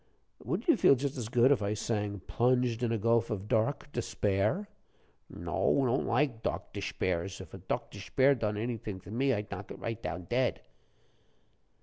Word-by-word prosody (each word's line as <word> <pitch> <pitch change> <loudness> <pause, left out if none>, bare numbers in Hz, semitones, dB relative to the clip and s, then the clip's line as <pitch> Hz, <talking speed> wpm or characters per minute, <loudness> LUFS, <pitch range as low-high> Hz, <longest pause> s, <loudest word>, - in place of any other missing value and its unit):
"Wouldn't - - -2
you 330 - +6
feel 140 - +6
just 140 +2 -2
as 120 -5 -4
good 120 +3 +5
if 135 - +3
I 100 +1 0
sang, 105 -2 -2
'Plunged 125 0 +1
in 120 -2 +1
a 115 - +1
gulf 115 +2 +2
of 105 -1 -3
dark 115 +7 0
despair?'" 105 - 0 0.6
"No, 140 - +1
don't 125 +2 +1
like 120 -2 +1
dokdishpairs; 95 -3 -2
if 95 -4 -10
a - - -7
dokdishpair 130 +7 +1
done 110 -5 -1
anyfing 110 -4 -4
to - - -10
me, 135 +4 +2
I'd 105 -3 -2
knock 100 0 -6
it - - -7
right 115 -2 -4
down 80 +4 -4
dead." 120 +8 0
115 Hz, 165 wpm, -31 LUFS, 105-125 Hz, 0.6 s, you